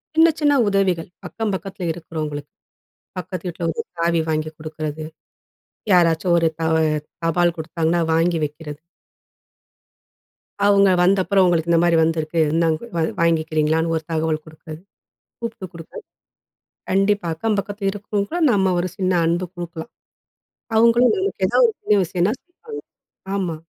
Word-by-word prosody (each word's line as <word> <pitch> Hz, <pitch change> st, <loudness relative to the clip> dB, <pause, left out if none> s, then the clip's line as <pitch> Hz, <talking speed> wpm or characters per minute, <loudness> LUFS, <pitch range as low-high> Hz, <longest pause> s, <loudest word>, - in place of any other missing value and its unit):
சின்ன 325 Hz, +1 st, +7 dB
சின்ன 295 Hz, -2 st, +3 dB, 0.2 s
உதவிகள் 185 Hz, -4 st, 0 dB, 0.2 s
அக்கம் 220 Hz, -3 st, -3 dB
பக்கத்தில 190 Hz, -2 st, -6 dB
இருக்கிறவங்களுக்கு. 155 Hz, -3 st, -6 dB, 0.7 s
பக்கத்து 185 Hz, 0 st, -6 dB
வீட்ல 170 Hz, 0 st, -4 dB
ஒரு -, -, -3 dB, 0.2 s
சாவி 170 Hz, 0 st, +2 dB
வாங்கி 155 Hz, 0 st, -1 dB
குடுக்குறது. 155 Hz, 0 st, -5 dB, 0.9 s
யாராச்சும் 170 Hz, 0 st, +3 dB
ஒரு 165 Hz, -1 st, +3 dB
தவ 160 Hz, 0 st, +1 dB, 0.5 s
தபால் 170 Hz, +1 st, +2 dB
கொடுத்தாங்கன்னா 165 Hz, +1 st, 0 dB
வாங்கி 165 Hz, +1 st, +2 dB
வைக்கிறது. 150 Hz, 0 st, -7 dB, 1.9 s
அவங்க 200 Hz, -1 st, +5 dB, 0.2 s
வந்தப்புறம், 190 Hz, +1 st, +3 dB
உங்களுக்கு 170 Hz, -1 st, +1 dB
இந்த 165 Hz, -, +4 dB
மாரி 170 Hz, -1 st, +3 dB
வந்திருக்கு. 160 Hz, 0 st, 0 dB
இந்தாங் 165 Hz, -1 st, +2 dB, 0.2 s
வா 165 Hz, -, +1 dB, 0.2 s
வாங்கிக்கிறீங்களான்னு 160 Hz, 0 st, +1 dB
ஒரு 160 Hz, -, -2 dB
தகவல் 155 Hz, -1 st, 0 dB
குடுக்கறது. 155 Hz, 0 st, -11 dB, 0.6 s
கூப்ட்டு 225 Hz, -4 st, -5 dB
கொடுக்க. 165 Hz, -1 st, -12 dB, 1.0 s
கண்டிப்பா, 195 Hz, 0 st, +2 dB
அக்கம் 215 Hz, +5 st, -1 dB
பக்கத் 205 Hz, +1 st, -5 dB
இருக்கிறவங்க 205 Hz, 0 st, -3 dB
கூட 350 Hz, -, -2 dB
நம்ம 195 Hz, -3 st, +2 dB
ஒரு 180 Hz, -, -2 dB
சின்ன 185 Hz, -1 st, 0 dB
அன்பு 175 Hz, +2 st, 0 dB
குடுக்கலாம். 175 Hz, +2 st, -7 dB, 0.8 s
அவங்களும் 235 Hz, -, +5 dB
நமக்கு 380 Hz, -, -1 dB
எதாவது 245 Hz, +1 st, +4 dB
ஒரு -, -, -17 dB
உதவி 200 Hz, -3 st, +3 dB
செய்யனும்ன்னா, 180 Hz, +3 st, +2 dB, 0.2 s
செய்வாங்க. 435 Hz, +5 st, -10 dB, 0.5 s
ஆமா. 180 Hz, -4 st, -2 dB
175 Hz, 130 wpm, -21 LUFS, 160-200 Hz, 1.9 s, சின்ன